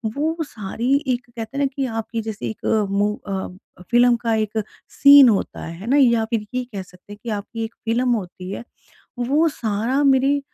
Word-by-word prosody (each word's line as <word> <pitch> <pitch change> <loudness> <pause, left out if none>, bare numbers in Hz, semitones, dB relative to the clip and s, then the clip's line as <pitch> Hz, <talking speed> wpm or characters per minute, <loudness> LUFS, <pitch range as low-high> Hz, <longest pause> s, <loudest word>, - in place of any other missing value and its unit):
वो 315 +3 0
सारी 230 +1 -3
एक 250 -1 -1
कहते 230 +2 -7
हैं 285 - +1
ना, 275 - +3
कि 270 -1 -1
आपकी 225 -1 -3
जैसे 210 - -5
एक 110 - -8 0.3
मू 205 +1 +1
अ, 195 - -4 0.6
फ़िल्म 240 0 +5
का 230 -1 -1
एक 215 0 -1 0.3
सीन 280 -3 +8
होता 200 - -1
है 165 - -6
है 210 - -8
ना 280 - +4
या 235 -5 +4
फिर 220 -1 -2
ये 255 - 0
कह 195 - -4
सकते 180 +2 -15
हैं 205 - -12
कि 235 - -5
आपकी 210 +2 -4
एक 225 - -9
फ़िल्म 240 +3 +1
होती 185 -3 -5
है 200 - -5 0.6
वो 290 +7 +2
सारा 235 +1 -1
मेरे 275 +1 +3
230 Hz, 200 wpm, -21 LUFS, 210-260 Hz, 0.6 s, सीन